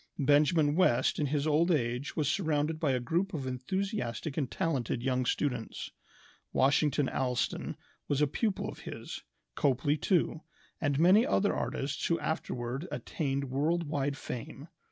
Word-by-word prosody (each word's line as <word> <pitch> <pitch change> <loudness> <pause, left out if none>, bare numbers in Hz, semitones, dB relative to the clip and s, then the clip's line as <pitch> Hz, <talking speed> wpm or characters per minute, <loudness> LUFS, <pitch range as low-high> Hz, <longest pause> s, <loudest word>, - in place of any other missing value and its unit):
Benjamin 145 +2 +4
West 175 -10 +3
in 150 - +1
his 145 +1 0
old 155 +3 +3
age 125 -3 0
was 150 -3 0
surrounded 155 -2 0
by 150 -4 +2
a 130 - +1
group 170 +10 -1
of 140 -4 -3
enthusiastic 135 - -3
and 140 -5 -1
talented 125 -7 -1
young 130 -1 +1
students. 125 -6 -2 0.6
Washington 145 +1 +3
Allston 125 -2 -1 0.3
was 145 - +1
a 150 - +5
pupil 200 - -1
of - - -7
his, - - -7 0.3
Copley 140 - +1
too, 160 0 +1 0.4
and 145 -4 +1
many 185 +8 +6
other 205 -5 +2
artists 140 +1 -2
who 170 - +1
afterward 130 -1 -3
attained 140 -4 -2
world 160 +6 +1
wide 145 -1 -1
fame. 130 +5 -7
145 Hz, 145 wpm, -31 LUFS, 130-160 Hz, 0.6 s, many